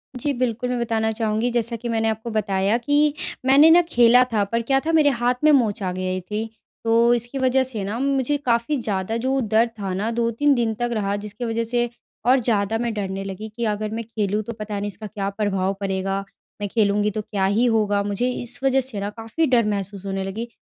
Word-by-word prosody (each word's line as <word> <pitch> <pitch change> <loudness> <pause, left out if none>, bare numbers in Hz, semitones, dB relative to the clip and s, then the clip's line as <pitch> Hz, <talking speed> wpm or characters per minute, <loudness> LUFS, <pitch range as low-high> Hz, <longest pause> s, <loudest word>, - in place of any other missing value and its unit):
जी 285 +4 -1
बिल्कुल, 250 0 -1
मैं 250 -1 -1
बताना 225 -1 0
चाहूँगी 220 +1 0
जैसा 235 0 0
कि 235 +1 -5
मैंने 225 -1 +1
आपको 220 +2 -4
बताया 200 0 +1
कि 290 +4 +2 0.3
मैंने 285 +4 +7
न 350 +1 +7
खेला 245 0 +6
था 205 -2 +3
पर 230 0 +1
क्या 270 +3 +2
था 325 - +1
मेरे 310 -3 +5
हाथ 245 +1 +3
में 305 - +6
मोच 230 -6 +2
आ 185 - -1
गई 185 0 -2
थी। 215 +4 -4 0.3
तो 230 +1 +4
इसकी 240 +3 -2
वजह 260 0 +3
से 230 -6 -4
न 200 +2 -3
मुझे 275 +1 +1
काफ़ी 235 +4 +1
ज़्यादा 205 +1 -2
जो 270 0 +1
दर्द 225 +1 +2
था 190 -2 -3
न 205 +4 -1
2-3 235 +5 +2
दिन 230 -2 0
तक 240 - 0
रहा 200 -2 -1
जिसकी 210 +3 -6
वजह 230 0 -1
से 240 +1 0 0.4
और 255 +2 +5
ज़्यादा 220 -2 0
मैं 235 -1 -2
डरने 195 -2 -3
लगी 195 +3 -6
कि 235 - -1
अगर 215 0 -1
मैं 230 +1 -3
खेलूँ 210 -2 -2
तो 235 - -6
पता 210 -2 -5
नहीं 205 - -3
इसका 205 +2 -6
क्या 200 -1 -3
प्रभाव 195 -2 -1
पड़ेगा? 195 0 -2 0.4
मैं 205 - -1
खेलूँगी 210 -1 +2
तो 215 - -3
क्या 200 -2 -2
ही 210 +6 +2
होगा 210 -3 +2
मुझे? 205 +5 -1
इस 245 -1 -4
वजह 270 0 +3
से 245 -6 -4
न 200 - -2
काफ़ी 225 +9 -1
डर 240 -4 +3
महसूस 200 -1 -3
होने 195 0 -2
लगी, 220 +5 -4
225 Hz, 220 wpm, -22 LUFS, 205-240 Hz, 0.4 s, मैंने